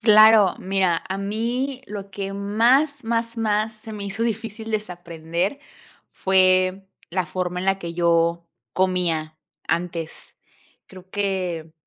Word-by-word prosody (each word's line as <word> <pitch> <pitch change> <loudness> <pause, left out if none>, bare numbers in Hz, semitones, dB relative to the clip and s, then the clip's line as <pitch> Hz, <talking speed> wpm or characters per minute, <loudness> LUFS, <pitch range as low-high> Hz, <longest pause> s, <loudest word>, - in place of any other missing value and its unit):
Claro, 215 -3 +7
mira, 185 -3 +1
a 190 - -2
mí 235 +7 -2
lo 200 -1 -7
que 195 0 -4
más, 240 +8 +2
más, 230 0 -1
más, 215 0 +1
se 220 +1 -10
me 205 -1 -6
hizo 200 +3 -2
difícil 225 0 -4
desaprender, 175 - -3 0.5
fue 185 0 +3 0.3
la 185 +1 0
forma 180 +2 -3
en 185 - -4
la 195 0 +2
que 170 -3 -6
yo 170 0 +2 0.3
comía 170 -4 0 0.3
antes. 170 -2 -1 0.8
Creo 185 -1 -14
que, 185 -5 -2
195 Hz, 125 wpm, -23 LUFS, 180-220 Hz, 0.8 s, Claro